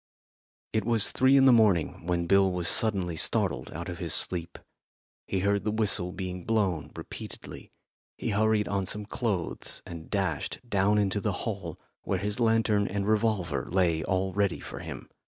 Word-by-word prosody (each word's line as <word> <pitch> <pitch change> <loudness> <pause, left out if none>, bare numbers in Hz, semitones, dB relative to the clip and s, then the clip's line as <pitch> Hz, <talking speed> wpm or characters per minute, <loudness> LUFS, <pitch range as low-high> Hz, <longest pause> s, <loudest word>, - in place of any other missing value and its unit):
It 110 - +1
was 115 -2 +2
three 130 +1 +4
in 135 - +6
the 130 - +7
morning 100 -8 +2
when 85 -1 0
Bill 95 +1 +4
was 90 -2 -1
suddenly 95 -6 +2
startled - - 0
out 85 +2 -6
of 85 -2 -6
his 85 -3 0
sleep. 85 -1 -2 0.7
He 95 - -1
heard 100 +1 +1
the 105 - 0
whistle 105 -4 0
being 90 -1 -5
blown 100 -7 0
repeatedly. - - -9 0.5
He - - -3
hurried 110 0 +2
on 100 -2 -1
some 105 0 -2
clothes 100 -5 -3
and 85 -2 -9
dashed 95 -8 -1
down 100 -1 +2
into 100 0 +1
the 105 - 0
hall, 100 -7 -4 0.2
where 95 - -1
his 105 +4 -3
lantern 110 -3 +2
and 100 0 -2
revolver 105 -8 0
lay 85 -3 +2
all 95 +1 -1
ready 100 -2 +1
for - - -8
him. - - -8
100 Hz, 170 wpm, -28 LUFS, 90-105 Hz, 0.7 s, the